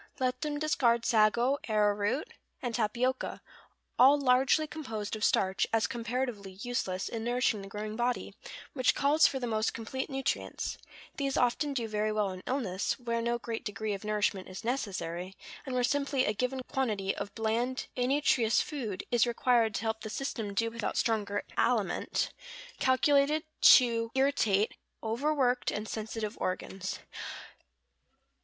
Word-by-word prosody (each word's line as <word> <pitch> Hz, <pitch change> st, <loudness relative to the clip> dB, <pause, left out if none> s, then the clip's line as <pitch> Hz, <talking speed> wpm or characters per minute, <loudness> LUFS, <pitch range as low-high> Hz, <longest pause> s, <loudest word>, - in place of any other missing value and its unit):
Let 255 Hz, 0 st, 0 dB
them 300 Hz, -1 st, -2 dB
discard 245 Hz, -6 st, +2 dB
sago, 235 Hz, +5 st, +3 dB
arrowroot, 210 Hz, +4 st, +1 dB, 0.3 s
and 245 Hz, -2 st, -3 dB
tapioca, 240 Hz, +3 st, -1 dB, 0.6 s
all 275 Hz, +3 st, +7 dB
largely 270 Hz, +3 st, +4 dB
composed 225 Hz, -10 st, -5 dB
of 215 Hz, -, -5 dB
starch, 190 Hz, -1 st, +2 dB
as 225 Hz, -1 st, +2 dB
comparatively 235 Hz, -4 st, -3 dB
useless 195 Hz, -7 st, -2 dB
in 225 Hz, -1 st, -4 dB
nourishing 240 Hz, -3 st, +1 dB
the 195 Hz, -, -8 dB
growing 210 Hz, +2 st, -5 dB
body, 240 Hz, +1 st, -1 dB, 0.4 s
which 255 Hz, -3 st, +2 dB
calls 295 Hz, +3 st, +5 dB
for 265 Hz, -, -2 dB
the 250 Hz, -, -2 dB
most 220 Hz, -1 st, 0 dB
complete 260 Hz, +5 st, -4 dB
nutrients; 270 Hz, -1 st, -2 dB, 0.4 s
these 275 Hz, -1 st, -1 dB
often 275 Hz, +4 st, +1 dB
do 235 Hz, -3 st, -1 dB
very 215 Hz, 0 st, 0 dB
well 210 Hz, -2 st, 0 dB
in 185 Hz, 0 st, -8 dB
illness, 215 Hz, -8 st, -1 dB
where 235 Hz, -2 st, -2 dB
no 235 Hz, +1 st, 0 dB
great 230 Hz, -1 st, -5 dB
degree 215 Hz, -1 st, -3 dB
of 195 Hz, -, -6 dB
nourishment 210 Hz, -3 st, 0 dB
is 185 Hz, -, -8 dB
necessary, 190 Hz, -7 st, -3 dB, 0.3 s
and 260 Hz, -, -3 dB
where 250 Hz, -, +2 dB
simply 280 Hz, 0 st, +1 dB
a 210 Hz, -, +1 dB
given 255 Hz, +4 st, -1 dB
quantity 210 Hz, -7 st, -1 dB
of 200 Hz, 0 st, -6 dB
bland, 235 Hz, +4 st, -1 dB
innutritious 250 Hz, -3 st, +2 dB
food 235 Hz, -11 st, -3 dB
is 240 Hz, 0 st, +4 dB
required 235 Hz, -2 st, +2 dB
to -, -, -1 dB
help 220 Hz, 0 st, -2 dB
the 215 Hz, -, -6 dB
system 220 Hz, -5 st, -4 dB
do 230 Hz, +2 st, +1 dB
without 230 Hz, -1 st, -3 dB
stronger 205 Hz, -3 st, 0 dB
aliment, -, -, +1 dB, 0.5 s
calculated 280 Hz, +3 st, +3 dB, 0.2 s
to 230 Hz, -3 st, +6 dB
irritate 230 Hz, -7 st, +2 dB, 0.3 s
overworked 255 Hz, +2 st, +1 dB
and 210 Hz, +1 st, -3 dB
sensitive 220 Hz, 0 st, -4 dB
organs. 190 Hz, +1 st, -3 dB
235 Hz, 145 wpm, -30 LUFS, 210-260 Hz, 0.6 s, all